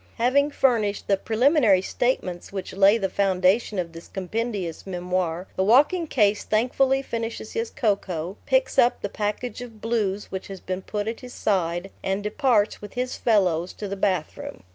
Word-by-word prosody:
Having 265 +5 +3
furnished 230 -8 +1
the 200 - +4
preliminary 225 - +3
statements 185 -7 -2
which 195 -1 -5
lay 200 +3 +5
the 195 -4 0
foundation 195 +3 +1
of 175 -2 -2
this 165 0 -11
compendious 195 -3 -4
memoir, 180 -1 -2
the 190 - +1
walking 295 - +4
case 210 -6 +2
thankfully 265 +4 +2
finishes 230 -3 -4
his 230 0 -2
cocoa, 190 -5 -1
picks - - +2
up 240 - +3
the 205 - -1
package 210 +5 -3
of 230 -3 -10
"blues" 210 -3 -1
which 190 0 -5
has 195 -1 -8
been 185 +1 -4
put 210 +2 -4
at 225 0 -3
his 250 -1 -10
side, 180 -1 -1
and 195 +1 -2
departs, 215 -1 +1
with 205 - -9
his 250 +1 -2
fellows, 185 -6 +1
to 210 - -6
the 200 - -4
bathroom. 185 - -2
205 Hz, 165 wpm, -24 LUFS, 190-235 Hz, -, lay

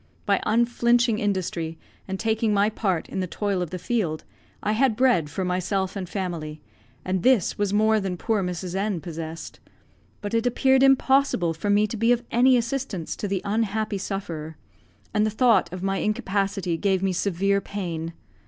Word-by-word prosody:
By - - +2
unflinching 235 0 +2
industry, 175 -5 -2 0.3
and 190 0 -4
taking 220 -1 +1
my 205 +2 +3
part 190 -6 -1
in - - -4
the 185 - -1
toil 200 0 -1
of 175 - -3
the 185 - -5
field, 180 -5 -1 0.4
I 210 - +1
had 230 +1 +2
bread 235 - +3
for 185 +5 -3
myself 185 +2 -1
and 185 -3 -5
family, 165 -6 -4 0.5
and 185 0 0
this 250 -4 +3
was 205 -1 +1
more 215 +1 +3
than 190 -3 -3
poor 220 +2 0
Mrs. 180 -1 -4
N 195 -1 -1
possessed; 165 -1 -7 0.6
but 205 +1 -5
it 230 +1 +2
appeared 265 +2 +3
impossible 270 -9 +3
for 165 +6 -4
me 205 +1 +4
to 215 +2 -5
be 230 +3 +3
of 245 -1 +2
any 250 +2 +5
assistance 235 -7 -3
to 205 - -3
the 195 -2 -2
unhappy 215 0 -1
sufferer, 165 -6 -5 0.6
and 210 -1 +2
the 215 - +2
thought 220 -5 +3
of 185 0 -6
my 195 0 0
incapacity 195 -5 -1
gave 190 0 +1
me 190 -1 +1
severe 200 +2 +1
pain. 170 -5 -4
200 Hz, 175 wpm, -25 LUFS, 180-220 Hz, 0.6 s, any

